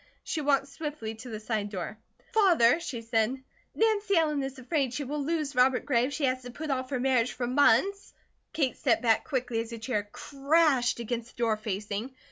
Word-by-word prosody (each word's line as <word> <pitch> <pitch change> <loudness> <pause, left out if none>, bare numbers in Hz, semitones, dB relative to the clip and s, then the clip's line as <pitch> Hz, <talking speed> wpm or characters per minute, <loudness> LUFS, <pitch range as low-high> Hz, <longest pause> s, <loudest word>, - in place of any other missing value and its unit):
She 315 - -3
walked 280 -1 +2
swiftly 295 -7 -5
to 245 +3 -10
the 215 -2 -5
side 215 -2 -2
door. 190 0 -5 0.4
"Father," 340 - +5
she 255 -9 -5
said, 225 +2 +1 0.4
"Nancy 425 -3 +2
Ellen 300 -3 +2
is 270 0 -5
afraid 260 -1 -1
she 290 - -2
will 290 +2 -3
lose 305 -1 -2
Robert 250 0 +3
Gray 245 -4 +2
if 280 - -4
she 290 - 0
has 255 0 0
to 250 - -9
put 300 +4 -5
off 260 -1 -2
her 265 -3 -1
marriage 250 -2 +2
for 245 - -3
months 375 +10 +3 0.2
" - - -47
Kate 275 -5 0
stepped 250 -2 +1
back 225 -2 +3
quickly 250 -5 -2
as 230 +1 -4
a - - -5
chair 215 -3 -3
crashed 280 -3 +2
against 235 +1 -4
the 240 - -1
door 225 -2 +2
facing. 210 +4 -4
255 Hz, 205 wpm, -28 LUFS, 230-290 Hz, 0.4 s, Father